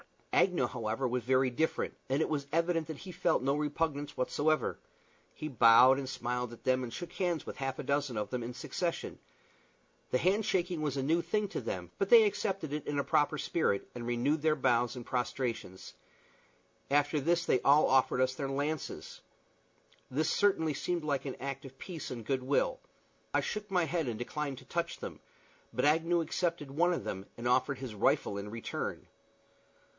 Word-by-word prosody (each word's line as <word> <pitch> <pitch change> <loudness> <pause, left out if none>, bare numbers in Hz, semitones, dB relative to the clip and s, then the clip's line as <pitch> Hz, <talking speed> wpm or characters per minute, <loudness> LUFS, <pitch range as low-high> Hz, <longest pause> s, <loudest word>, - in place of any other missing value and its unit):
Agnew, 180 -9 +3
however, 120 +1 -2
was 125 +1 -1
very 130 +1 +3
different, 160 +6 0 0.2
and 135 +3 +1
it - - +1
was 145 -3 -2
evident 165 -1 +1
that 160 -3 -6
he 185 - -8
felt 175 -6 +1
no 135 +1 +2
repugnance 150 0 -2
whatever. 155 +4 +1 0.6
He 155 - -5
bowed 130 0 +7
and 135 -2 -4
smiled 125 -1 -2
at 120 - -13
them, 130 0 +2
and 120 - -5
shook 175 +8 -7
hands 175 -4 -1
with - - -7
half 135 -1 -3
a - - -4
dozen 140 -4 0
of 105 -1 -3
them 125 -1 -2
in 120 +1 -5
succession. 155 +6 -3 0.9
The - - +2
hand 190 - +2
shaking 180 -4 0
was 145 -2 -1
a 135 - 0
new 165 +5 +2
thing 210 +2 -1
to - - -4
them, - - -5
but - - 0
they 470 -2 +9
accepted 195 - -1
it 150 - -4
in 145 - -1
a 140 - +2
proper 145 +2 +2
spirit, 145 -11 0
and 120 -1 -6
renewed 130 +6 +1
their 155 0 +3
bows 125 -3 +2
and 120 -2 -7
prostrations. 120 -6 -3 1.0
After 145 +2 +2
this 170 +5 +1
they 130 - +3
all 145 +2 +5
offered 130 -1 +3
us 130 0 +2
their 135 +1 -3
lances. 145 +3 -3 0.9
This 150 +4 0
certainly 160 -6 +2
seemed 170 +4 -2
like 145 -2 -1
an 135 - -4
act 140 0 -4
of 135 0 -11
peace 170 -6 -6
and 120 -3 -6
good 130 +1 0
will. - - +1 0.6
I - - +4
shook 210 -1 -4
my 180 -2 +2
head 165 -2 -1
and 115 -3 -2
declined 140 +3 -3
to - - -16
touch 170 0 -2
them; - - -7 0.5
but - - 0
Agnew 165 +3 +3
accepted 165 -3 -2
one 175 +5 +3
of - - -3
them, 95 +1 -5
and 120 +1 -3
offered 130 +2 +2
his 130 -4 -6
rifle 100 0 +1
in 100 +1 -6
return. 115 +1 -4
140 Hz, 190 wpm, -32 LUFS, 125-165 Hz, 1.0 s, they